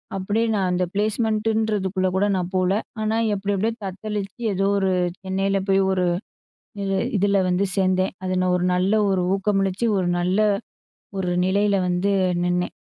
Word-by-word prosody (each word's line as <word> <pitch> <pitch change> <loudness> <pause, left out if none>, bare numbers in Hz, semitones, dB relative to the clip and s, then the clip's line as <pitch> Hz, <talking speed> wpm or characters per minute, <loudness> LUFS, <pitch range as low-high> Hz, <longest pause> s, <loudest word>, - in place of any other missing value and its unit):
அப்டியே 205 +4 0
நான் 190 -3 +1
அந்த 180 0 +1
ப்ளேஸ்மெண்ட்ன்றதுக்குள்ள 215 -2 0
கூட 195 +2 +2
நான் 180 -1 -2
போகல. 185 0 +2 0.3
ஆனா, 215 +1 0 0.2
எப்டி 200 +1 -2
எப்டியோ 220 +4 0
தத்தளிச்சு 200 +1 -5
ஏதோ 195 +1 0
ஒரு, 190 -1 +1 0.3
சென்னையில 195 +1 0
போய் 195 0 +4
ஒரு, 185 -1 +1 0.8
இது 195 0 -1 0.2
இதுல 200 0 +2
வந்து 180 +2 +1
சேந்தேன். 185 -1 +1
அதுல 185 0 0
ஒரு 180 - -1
நல்ல 185 +3 +1 0.2
ஒரு 190 -2 +1
ஊக்கமளிச்சி, 195 +1 0
ஒரு 180 -2 0
நல்ல 180 +3 0 0.8
ஒரு 180 -2 -1 0.2
நிலையில 200 +1 +2
வந்து 180 +3 0 0.3
நின்னேன், 180 0 -1
195 Hz, 145 wpm, -23 LUFS, 185-205 Hz, 0.8 s, போய்